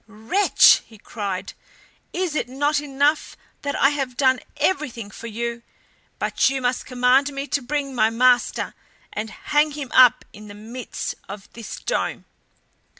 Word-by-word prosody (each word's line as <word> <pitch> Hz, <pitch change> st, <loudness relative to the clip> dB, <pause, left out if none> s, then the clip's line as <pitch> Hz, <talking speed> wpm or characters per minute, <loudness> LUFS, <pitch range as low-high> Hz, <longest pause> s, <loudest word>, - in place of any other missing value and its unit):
"Wretch!" 225 Hz, -, +4 dB
he 220 Hz, -, -16 dB
cried, 200 Hz, -3 st, -5 dB, 0.6 s
"is 360 Hz, -3 st, -2 dB
it 300 Hz, -, -2 dB
not 290 Hz, +3 st, +1 dB
enough 290 Hz, +1 st, 0 dB, 0.2 s
that 285 Hz, 0 st, -3 dB
I 275 Hz, -, +4 dB
have 270 Hz, -4 st, -3 dB
done 260 Hz, -2 st, +3 dB, 0.2 s
everything 245 Hz, -, -1 dB
for 230 Hz, -, -9 dB
you, 235 Hz, +1 st, -4 dB, 0.6 s
but -, -, +1 dB
you 270 Hz, 0 st, -2 dB
must 250 Hz, 0 st, -1 dB
command 255 Hz, +3 st, +3 dB
me 275 Hz, 0 st, -4 dB
to 285 Hz, -, 0 dB
bring 275 Hz, +1 st, -3 dB
my 220 Hz, -3 st, +3 dB
master 245 Hz, +1 st, +2 dB, 0.4 s
and 215 Hz, +1 st, -4 dB
hang 300 Hz, +5 st, 0 dB
him 280 Hz, -3 st, -6 dB
up 250 Hz, -1 st, +6 dB
in 210 Hz, 0 st, -12 dB
the 205 Hz, -, -10 dB
midst 230 Hz, +4 st, -6 dB, 0.2 s
of 200 Hz, -1 st, -8 dB
this 230 Hz, -2 st, -7 dB
dome? -, -, -2 dB
255 Hz, 150 wpm, -22 LUFS, 230-285 Hz, 0.6 s, up